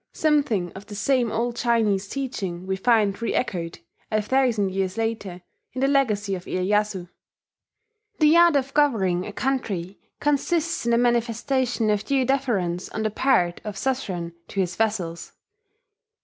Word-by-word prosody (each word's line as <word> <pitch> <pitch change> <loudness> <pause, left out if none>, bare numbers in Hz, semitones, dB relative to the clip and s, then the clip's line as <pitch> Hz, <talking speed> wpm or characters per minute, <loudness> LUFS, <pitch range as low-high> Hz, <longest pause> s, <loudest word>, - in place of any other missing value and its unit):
Something 280 - +1
of 200 +2 -11
the 205 - -8
same 240 +2 +1
old 235 +1 -1
Chinese 220 -5 +1
teaching 195 -10 -4
we 190 0 -1
find 210 0 +3
reechoed, 190 -6 -3 0.3
a 215 - +1
thousand 220 -3 +1
years 190 +1 -2
later, 210 -6 -3 0.3
in 255 - -4
the 270 - +3
Legacy 215 -8 +1
of 180 -1 -5
Iyeyasu: 195 0 0 1.1
"The 305 0 +5
art 340 -2 +6
of 275 0 0
governing 195 -12 +2
a - - -5
country 200 -8 -2 0.2
consists 305 +2 0
in - - +1
the 235 - +4
manifestation 240 0 +1
of 210 0 0
due 270 +1 +1
deference 215 -10 0
on 220 - -3
the 215 - 0
part 190 -8 +1
of 210 -2 -5
a - - -9
suzerain 185 -11 -2
to 195 - -5
his 180 -2 0
vassals. 190 -6 -2
220 Hz, 150 wpm, -24 LUFS, 190-260 Hz, 1.1 s, art